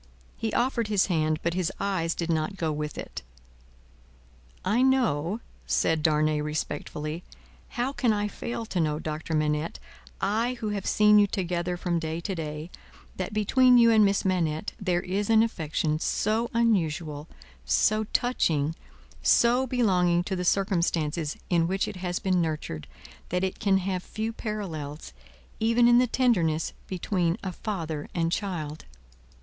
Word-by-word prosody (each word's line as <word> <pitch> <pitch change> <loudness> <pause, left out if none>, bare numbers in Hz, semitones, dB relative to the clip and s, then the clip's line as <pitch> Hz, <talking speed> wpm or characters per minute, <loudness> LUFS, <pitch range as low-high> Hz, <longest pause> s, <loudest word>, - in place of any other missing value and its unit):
He 225 - -3
offered 240 -2 +1
his 205 -2 +3
hand; 155 -1 +1
but 170 - 0
his 180 -2 0
eyes 185 -4 0
did 170 0 -2
not 160 +5 -1
go 160 -3 -1
with 150 0 -4
it. - - -6 1.4
"I 215 +6 +2
know," 230 - +2 0.3
said 160 -1 +2
Darnay, 155 -1 +2
respectfully, 150 +1 -4 0.5
"how 250 +3 0
can 245 -4 +2
I 210 -1 0
fail 230 +2 -5
to 195 -4 -3
know, 155 -2 +1
Doctor 155 +1 -4
Manette, 150 +1 0 0.4
I 225 +5 0
who 225 -3 -4
have 200 -2 -3
seen 210 0 +5
you 205 - +5
together 180 -2 -2
from 175 -1 -1
day 160 0 -3
to 190 +3 -3
day, 155 0 -5 0.5
that 185 +2 -3
between 250 +4 +4
you 230 -1 +6
and 220 -1 +6
Miss 200 -1 +2
Manette 170 -2 0
there 180 -4 0
is 195 +3 -2
an 225 0 +6
affection 155 -7 -1
so 220 +7 0
unusual, 165 -9 0 0.4
so 205 - +2
touching, 165 - +1 0.5
so 245 +3 +4
belonging 180 -8 +2
to 190 +1 -3
the 180 - -2
circumstances 170 -5 0
in 165 -1 +3
which 190 +2 0
it 190 - -6
has 180 -1 -2
been 185 -3 +1
nurtured, 155 - -3 0.4
that 180 +1 0
it 190 - -2
can 195 -2 +3
have 185 -1 -2
few 220 +4 -4
parallels, 165 - -5 0.5
even 230 +2 +4
in 240 0 +6
the 250 - +3
tenderness 175 -12 +1
between 180 -2 0
a 190 - -2
father 165 -6 -4
and 165 -1 +1
child. 165 -6 -3
180 Hz, 155 wpm, -27 LUFS, 160-215 Hz, 1.4 s, you